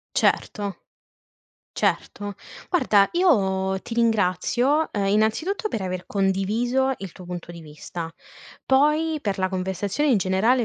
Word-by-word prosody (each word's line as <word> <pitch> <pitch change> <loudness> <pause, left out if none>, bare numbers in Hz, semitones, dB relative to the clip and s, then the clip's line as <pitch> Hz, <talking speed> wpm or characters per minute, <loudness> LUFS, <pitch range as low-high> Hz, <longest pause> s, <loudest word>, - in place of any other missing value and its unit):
Certo, 200 -3 0 0.9
certo. 205 -1 -1 0.4
Guarda 210 - +4
io 190 - +2
ti 230 - -6
ringrazio, 235 - +2
uhm, 200 -2 0
innanzitutto 220 - +1
per 220 - -3
aver 185 -1 -4
condiviso 215 +7 +1
il 195 -3 -7
tuo 185 - -12
punto 175 -1 -7
di 170 -1 -9
vista. 160 +2 -7 0.6
Poi 300 +4 +3
per 200 -6 -2
la 185 0 +1
conversazione 190 - -1
in 230 - +4
generale, 205 +7 +2
205 Hz, 125 wpm, -24 LUFS, 190-260 Hz, 0.9 s, Guarda